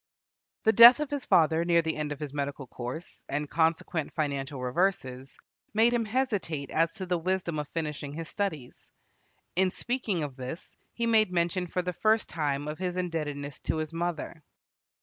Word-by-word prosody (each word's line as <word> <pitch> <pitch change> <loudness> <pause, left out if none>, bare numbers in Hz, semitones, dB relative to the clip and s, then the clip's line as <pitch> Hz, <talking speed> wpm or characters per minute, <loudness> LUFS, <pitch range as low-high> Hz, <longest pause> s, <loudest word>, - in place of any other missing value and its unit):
The 220 - +4
death 235 +4 +10
of 300 -2 -3
his 285 -2 -3
father 160 0 +4
near 170 -1 +3
the 160 0 -1
end 150 -1 -3
of 145 - -5
his 150 -2 -5
medical 140 -1 -3
course, 125 +7 -7
and 150 +1 -1
consequent 160 0 0
financial 140 -3 -2
reverses, 130 -2 -1 0.4
made 230 +2 +5
him 235 -2 +1
hesitate 205 - -1
as 165 +1 +2
to 190 - -5
the 180 -1 0
wisdom 175 -2 -1
of 150 - -4
finishing 150 -3 -4
his 165 +1 -5
studies. 155 -12 -4 0.6
In 185 +1 +3
speaking 215 -5 -2
of 140 -3 -5
this, 130 +6 -7 0.2
he 235 - -2
made 220 -4 +4
mention 175 +1 0
for 180 +1 -2
the 180 0 -2
first 220 +5 +2
time 145 -2 -1
of 150 +2 -5
his 180 -1 -2
indebtedness 145 -6 -3
to - - -2
his 155 +1 -3
mother. 170 -1 -3
165 Hz, 175 wpm, -28 LUFS, 145-185 Hz, 0.6 s, death